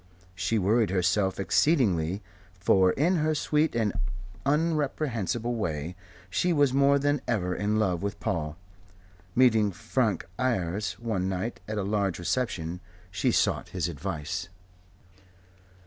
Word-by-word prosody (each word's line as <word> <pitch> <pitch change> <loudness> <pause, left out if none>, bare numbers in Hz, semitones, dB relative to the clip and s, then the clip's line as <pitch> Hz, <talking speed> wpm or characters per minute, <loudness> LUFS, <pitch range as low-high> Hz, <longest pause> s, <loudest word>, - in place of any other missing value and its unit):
She 95 +4 0
worried 110 +3 +3
herself 95 +1 +1
exceedingly, 100 - +2 0.4
for 95 +1 +4
in 170 +6 +2
her 155 0 +1
sweet 150 -1 +1
and 110 -3 +1 0.5
unreprehensible 140 - 0
way 85 -6 -3 0.3
she 175 - +1
was 145 -5 +3
more 140 +1 +5
than 145 0 +1
ever 90 -7 0
in 105 +3 0
love 95 -5 +1
with 100 0 -3
Paul. 75 -1 -2 0.8
Meeting 110 -5 +4
Frank 110 0 -1
Ayres 105 -5 0
one 105 -6 -2
night 95 +5 -3
at 110 0 -3
a 105 - 0
large 100 -3 0
reception, 90 -4 -2 0.3
she 95 -1 +1
sought - - +1
his - - +1
advice. 85 0 -4
105 Hz, 125 wpm, -28 LUFS, 90-130 Hz, 0.8 s, more